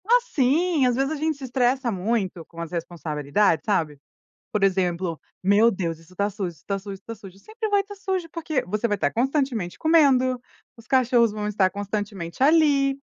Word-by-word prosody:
Ah, 480 +3 +5
sim. 310 - +2
Às 250 -1 +2
vezes 270 +3 0
a - - -1
gente 310 0 -1
se 280 - -11
estressa 255 0 +1
muito 190 -3 -2
com 170 - -13
as 165 - -6
responsabilidades, 165 0 0
sabe. 160 -8 0 0.5
Por 210 -2 0
exemplo: 180 -3 0 0.2
"Meu 205 +4 +5
Deus, 170 -6 -3
isso 165 +2 -19
está 200 +3 0
sujo, 200 -2 -4
isso 165 -4 -15
está 200 +4 -3
sujo, 200 +1 -7
isso 195 - -11
está 230 - -7
sujo", 195 -3 -13
sempre 435 - -5
vai 405 -1 +3
estar 405 +1 -11
sujo, 380 -3 -3
porque 315 -4 -2
você 210 +5 -1
vai 205 - 0
estar 200 - 0
constantemente 250 - -1
comendo, 265 -6 +3 0.4
os 230 -1 -16
cachorros 245 -3 +3
vão 210 0 -4
estar 200 -3 +2
constantemente 205 -2 -5
ali. 280 -2 +4
220 Hz, 190 wpm, -24 LUFS, 185-275 Hz, 0.5 s, Ah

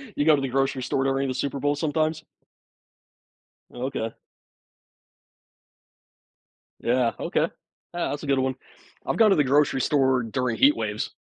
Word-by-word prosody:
You 145 - 0
go 155 -1 +6
to 140 - -2
the 135 - -1
grocery 135 0 0
store 135 +1 0
during 135 0 0
the 130 - -2
Super 140 +2 -3
Bowl 145 +2 +1
sometimes? 155 +1 -1 1.5
Okay. 125 -3 -4 2.7
Yeah. 120 -1 +1
Okay. - - 0 0.5
Ah, 175 0 -2
that's 145 +1 -5
a - - -6
good 140 -1 +2
one. 130 0 0 0.5
I've - - -1
gone 220 -2 +6
to 195 - +4
the 150 - +3
grocery 135 -1 +2
store 130 -3 +2
during 120 +1 -2
heat 290 +3 +5
waves. - - -3
135 Hz, 150 wpm, -25 LUFS, 130-150 Hz, 2.7 s, go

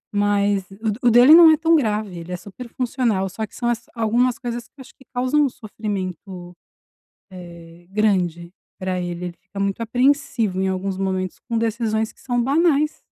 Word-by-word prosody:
Mas 205 -1 +1
o 220 - -4
d 205 - -5
o 240 - +5
dele 245 +6 +8
não 335 -1 +9
é 310 - +4
tão 330 +1 +3
grave, 210 - -1
ele 170 +2 -9
é 180 - -3
super 205 +7 -11
funcional, 230 -6 -1
só 220 +4 -4
que - - -19
são 240 - -3
as 235 0 -2
algumas 235 +2 +1
coisas 240 -1 -5
que 275 - -28
acho 265 - -13
que - - -20
causam 260 +4 +2
sofrimento, 190 -5 -6 0.8
eh, 170 -1 -12
grande 180 -5 0 0.3
pra 185 -1 -3
ele. 175 0 -4
Ele 175 - -10
fica 190 +1 -10
muito 200 +1 -1
apreensivo 245 -4 +1
em 190 - +1
alguns 190 0 -2
momentos 185 -1 -3
com 230 - -1
decisões 220 -1 -1
que - - -28
são 245 -2 -1
banais. 300 +1 +1
215 Hz, 185 wpm, -21 LUFS, 185-245 Hz, 0.8 s, não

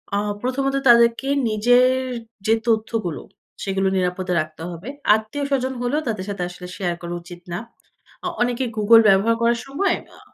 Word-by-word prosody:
আ - - +2 0.2
প্রথমত 270 +2 -1
তাদেরকে 235 +2 +5 0.2
নিজের 245 +4 +4 0.6
যে 220 - +4
তথ্যগুলো, 220 -7 -1 0.4
সেগুলো 195 0 0
নিরাপদে 180 0 -1
রাখতে 155 +1 -9
হবে। 175 +8 -8 0.3
আত্মীয়স্বজন 265 +4 -2
হলেও 260 +5 0
তাদের 210 -5 -2
সাথে 195 -3 -3
আসলে 180 0 -10
শেয়ার 175 -3 -1
করা 175 0 -5
উচিত 175 0 -12
না। 175 - -2 0.7
আ - - 0
অনেকে 245 +1 +1
Google 225 +2 +7
ব্যবহার 200 +4 +4
করার 235 0 +2
সময়, 350 +7 0 0.2
আ - - -17
220 Hz, 150 wpm, -22 LUFS, 185-245 Hz, 0.7 s, Google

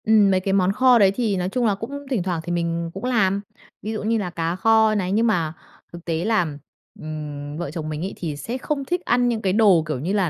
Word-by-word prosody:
Ừm, 215 -2 +5
mấy 185 - +3
cái 195 +1 -1
món 190 -1 +3
kho 250 +3 +5
đấy 195 -2 +5
thì 220 -6 0
nói 180 0 -1
chung 245 +4 0
là 210 -3 +2
cũng 280 +8 -7
thỉnh 240 -10 0
thoảng 175 -3 -2
thì 175 - -5
mình 170 -1 -1
cũng 195 - -8
làm, 200 -6 +1 0.4
ví 215 - -4
dụ 215 - -4
như 225 +2 +1
là 200 -4 -2
cá 165 0 -2
kho 220 +2 +4
này. 190 -3 -1
Nhưng 225 +4 +2
mà 165 -8 0 0.4
thực 170 0 -10
tế 165 +1 -1
là, 220 -5 +2 0.5
ừm, 150 -1 -6
vợ 170 -4 -4
chồng 155 -1 -5
mình 155 0 -4
ấy 195 - -5
thì 160 -4 -4
sẽ 230 - -4
không 275 +1 -3
thích 355 +5 -1
ăn 245 0 +2
những 225 -2 -1
cái 190 -3 0
đồ, 200 -6 +5
kiểu 155 -5 -2
như 170 +9 -2
là, 195 -4 +1
195 Hz, 260 wpm, -22 LUFS, 170-225 Hz, 0.5 s, Ừm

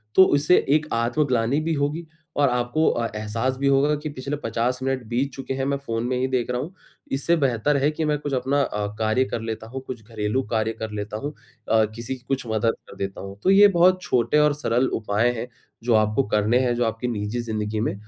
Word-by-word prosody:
तो 190 - +9
उससे 150 +5 +4
एक 150 +2 +3
आत्मग्लानी 120 +2 +1
भी 160 +1 -1
होगी 150 +3 -1 0.3
और 140 -2 +4
आपको 125 +6 +1
अ, 120 - -1
एहसास 115 +5 -2
भी 140 +1 0
होगा 140 +2 +3
कि 150 +1 -5
पिछले 140 +1 -4
50 120 +2 -1
मिनट 135 -1 -1
बीत 130 +4 0
चुके 135 0 -5
हैं 135 0 -2
मैं 140 0 0
फ़ोन 115 -5 -3
में 125 0 0
ही 130 +1 0
देख 125 -2 -1
रहा 125 0 -1
हूँ। 170 +6 -7 0.4
इससे 145 +5 +2
बेहतर 135 0 +1
है 145 - +4
कि 155 +1 -2
मैं 150 -1 +1
कुछ 145 -1 -4
अपना 135 +2 +1
अ, 105 -5 -1
कार्य 110 +4 +2
कर 120 - -4
लेता 110 0 -5
हूँ, 130 +3 -6
कुछ 120 -4 -6
घरेलू 110 +2 -1
कार्य 110 -1 0
कर 110 -1 -4
लेता 105 0 -4
हूँ 145 +7 -5 0.4
अ, 110 -1 +4
किसी 115 +3 -4
की 125 -1 -18
कुछ 135 -3 -2
मदद 110 +1 +1
कर - - -12
देता 95 0 -4
हूँ। 100 +1 -9
तो - - +3
ये 200 +1 +8
बहुत 185 +2 +5
छोटे 125 0 +2
और 150 -1 +4
सरल 130 -3 +1
उपाय 110 +3 +1
हैं 120 - -4 0.4
जो 120 0 +2
आपको 110 +5 +3
करने 105 +4 +2
हैं, 125 -2 +1
जो 120 - +1
आपकी 115 +2 -2
निजी 110 0 -2
ज़िंदगी 110 -2 -3
में 110 - 0
125 Hz, 230 wpm, -24 LUFS, 110-140 Hz, 0.4 s, तो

